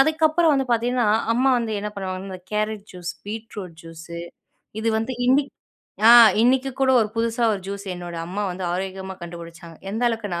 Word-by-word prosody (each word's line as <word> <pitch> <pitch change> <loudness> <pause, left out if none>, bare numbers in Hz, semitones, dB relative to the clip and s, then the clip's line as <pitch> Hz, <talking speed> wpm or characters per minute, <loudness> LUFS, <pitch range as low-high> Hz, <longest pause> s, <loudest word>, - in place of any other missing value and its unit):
அதுக்கப்புறம் 315 +2 +3
வந்து 270 -1 0
பாத்தீங்கன்னா, 240 0 +1 0.3
அம்மா 260 +2 +3
வந்து 230 -2 -3
என்ன 210 - -3
பண்ணுவாங்கன்னா 190 0 -5
இந்த 185 -1 -8
கேரட் 215 -1 -2
ஜூஸ், 175 -1 -6
பீட்ரூட் 210 -5 -7
ஜூஸ். 165 +1 -11 0.7
இது 225 - 0
வந்து 230 +4 -3
இன்னிக்கு 275 +2 +3 0.6
ஆ - - +10 0.3
இன்னைக்கு 260 +3 +3
கூட 265 -1 +3
ஒரு 215 - +1
புதுசா 230 +1 0
ஒரு 195 - -3
ஜூஸ் 200 0 -5
என்னோட 175 -1 -7
அம்மா 200 +4 -3
வந்து 180 +1 -5
ஆரோக்கியமா 190 +1 -4
கண்டுபுடிச்சாங்க. 170 -1 -10
எந்த 225 +4 -3
அளவுக்குனா 205 -7 -3
210 Hz, 165 wpm, -23 LUFS, 185-245 Hz, 0.7 s, ஆ